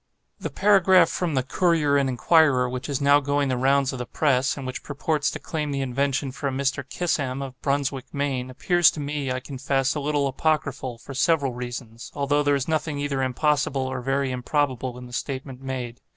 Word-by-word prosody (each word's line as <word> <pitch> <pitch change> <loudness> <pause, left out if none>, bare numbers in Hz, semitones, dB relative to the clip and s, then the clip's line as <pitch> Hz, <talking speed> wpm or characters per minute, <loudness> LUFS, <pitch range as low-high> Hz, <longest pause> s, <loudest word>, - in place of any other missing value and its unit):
The - - -4
paragraph 190 -4 +5
from 165 -3 -2
the 130 - +2
'Courier 160 -1 +2
and 140 -1 +2
Enquirer,' 130 0 +4
which 125 +3 -5
is 140 -1 -1
now 140 +1 +5
going 145 0 0
the 130 - +1
rounds 135 +1 +2
of 130 - -5
the 125 - -4
press, 135 -2 +1
and 135 - -6
which 130 0 -5
purports 145 +1 -1
to - - -5
claim 150 -2 -4
the 140 -1 -2
invention 135 +1 -1
for 140 +2 -4
a - - -1
Mr. 140 +1 -1
Kissam, 140 -7 -1
of 130 -1 -9
Brunswick, 140 -2 -1
Maine, 135 -3 -2
appears 175 +6 +3
to - - -6
me, 145 -2 -3
I 130 - -1
confess, 135 0 -1
a 150 - -3
little 145 0 0
apocryphal, 135 -3 -1
for 135 - -10
several 140 -1 +2
reasons; 120 -1 -7
although 145 0 +1
there 145 -1 +2
is 135 -2 -2
nothing 155 -2 -1
either 140 -1 -1
impossible 135 +1 +1
or 130 -1 -3
very 135 +1 0
improbable 130 -1 -1
in 125 - -9
the 125 - -12
statement 130 0 -5
made. 125 -3 -5
140 Hz, 200 wpm, -24 LUFS, 130-145 Hz, -, paragraph